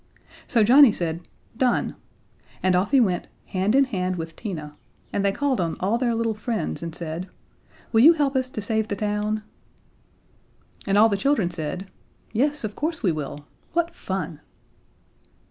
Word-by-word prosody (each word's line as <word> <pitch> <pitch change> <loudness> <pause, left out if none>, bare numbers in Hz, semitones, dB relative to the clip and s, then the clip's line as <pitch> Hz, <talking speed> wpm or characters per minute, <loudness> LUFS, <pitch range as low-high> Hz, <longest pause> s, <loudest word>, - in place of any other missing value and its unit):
So 230 -4 +3
Johnnie 260 +3 +8
said, 170 -2 -3 0.3
"Done," 250 0 +1 0.7
and 185 -1 +3
off 185 +3 +1
he 275 - +5
went, 190 -7 +1 0.2
hand 195 +5 0
in 275 - +6
hand 185 -8 -2
with 165 -1 -6
Tina, 155 -9 -6 0.4
and 200 - 0
they 200 - +3
called 265 -1 0
on 165 -2 -2
all 205 +6 +1
their 240 -2 +1
little 225 -1 0
friends 220 +1 -3
and 165 -1 -5
said: 170 +2 -5 0.6
"Will 225 - +5
you 315 +7 +9
help 290 -4 0
us 260 -1 0
to 215 -5 -5
save 220 0 0
the 205 - -2
town?" 210 +1 -1 1.4
And 195 +1 +3
all 215 +2 +7
the 200 -3 0
children 210 -6 +1
said: 170 +3 -3 0.5
"Yes, 285 +5 +1
of 215 -1 -4
course 320 +2 -3
we 185 - +3
will. 150 -1 -5 0.3
What 340 0 0
fun!" 180 - -4
210 Hz, 165 wpm, -24 LUFS, 180-250 Hz, 1.4 s, you